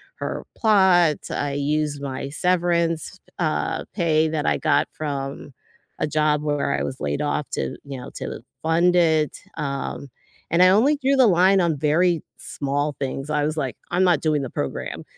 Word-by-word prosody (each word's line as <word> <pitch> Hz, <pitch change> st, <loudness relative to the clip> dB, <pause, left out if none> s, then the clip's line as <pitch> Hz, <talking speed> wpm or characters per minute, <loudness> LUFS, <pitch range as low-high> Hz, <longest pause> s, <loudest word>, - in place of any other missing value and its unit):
her -, -, -5 dB
plot, 190 Hz, -7 st, +4 dB
I 145 Hz, -1 st, -2 dB
used 145 Hz, 0 st, -1 dB
my 135 Hz, 0 st, -4 dB
severance, 170 Hz, +1 st, 0 dB, 0.2 s
uh, 155 Hz, -3 st, -1 dB
pay 160 Hz, -4 st, +2 dB
that 155 Hz, -2 st, -2 dB
I -, -, +2 dB
got -, -, +2 dB
from 140 Hz, -2 st, -5 dB, 0.5 s
a 155 Hz, -, 0 dB
job 150 Hz, 0 st, +1 dB
where 145 Hz, -2 st, 0 dB
I -, -, -2 dB
was 130 Hz, -, -5 dB
laid 75 Hz, 0 st, -1 dB
off -, -, -1 dB
to, 65 Hz, -, -3 dB
you 135 Hz, -2 st, -6 dB
know, -, -, -8 dB
to -, -, -6 dB, 0.2 s
fund 170 Hz, +2 st, +3 dB
it, 160 Hz, -3 st, +2 dB, 0.2 s
um, 140 Hz, -1 st, -4 dB, 0.4 s
and 175 Hz, +2 st, +5 dB
I 185 Hz, -, +7 dB
only 255 Hz, +10 st, +4 dB
drew 275 Hz, 0 st, +2 dB
the 255 Hz, -3 st, +6 dB
line 190 Hz, +1 st, +4 dB
on 165 Hz, -4 st, +1 dB
very 160 Hz, +3 st, +2 dB, 0.2 s
small 145 Hz, +1 st, -2 dB
things. 135 Hz, +1 st, -4 dB
I 150 Hz, -1 st, +1 dB
was 155 Hz, +1 st, -2 dB
like, 135 Hz, -4 st, -2 dB, 0.2 s
"I'm 180 Hz, +2 st, +2 dB
not 175 Hz, -5 st, +3 dB
doing 155 Hz, -3 st, +1 dB
the 130 Hz, -, -4 dB
program," -, -, -4 dB
155 Hz, 175 wpm, -23 LUFS, 140-175 Hz, 0.5 s, I